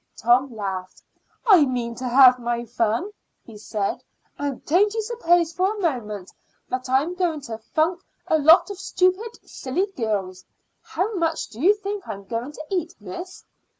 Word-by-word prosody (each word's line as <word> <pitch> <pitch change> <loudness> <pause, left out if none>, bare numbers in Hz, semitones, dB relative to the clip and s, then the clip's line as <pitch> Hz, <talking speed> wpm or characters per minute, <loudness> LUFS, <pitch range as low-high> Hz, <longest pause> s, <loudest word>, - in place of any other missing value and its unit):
Tom 250 +3 +3
laughed. 190 -3 -5 0.4
"I 385 -9 +7
mean 245 -3 -2
to 250 +2 -5
have 255 0 +7
my 240 0 -2
fun," 230 - -1 0.3
he 225 - -12
said; 210 -1 -3 0.4
"and 285 -3 -4
don't 385 +7 +3
you 445 - 0
suppose 350 -8 +2
for 375 +5 0
a - - -7
moment 215 - -3 0.6
I'm 275 +7 +2
going 350 -5 -1
to 225 -4 -7
funk 320 +9 0 0.2
a 315 - +2
lot 320 +7 +6
of 390 - -8
stupid, 380 +4 0
silly 280 +9 -2
girls. 200 -6 -2 0.4
How 375 +7 -2
much 330 -4 -1
do 230 +2 -10
you 395 +6 +5
think 410 -1 -5
I'm 200 -3 -6
going 235 +6 -4
to 300 - -9
eat, 350 -4 -2
miss?" 350 - -9
285 Hz, 160 wpm, -23 LUFS, 230-365 Hz, 0.6 s, I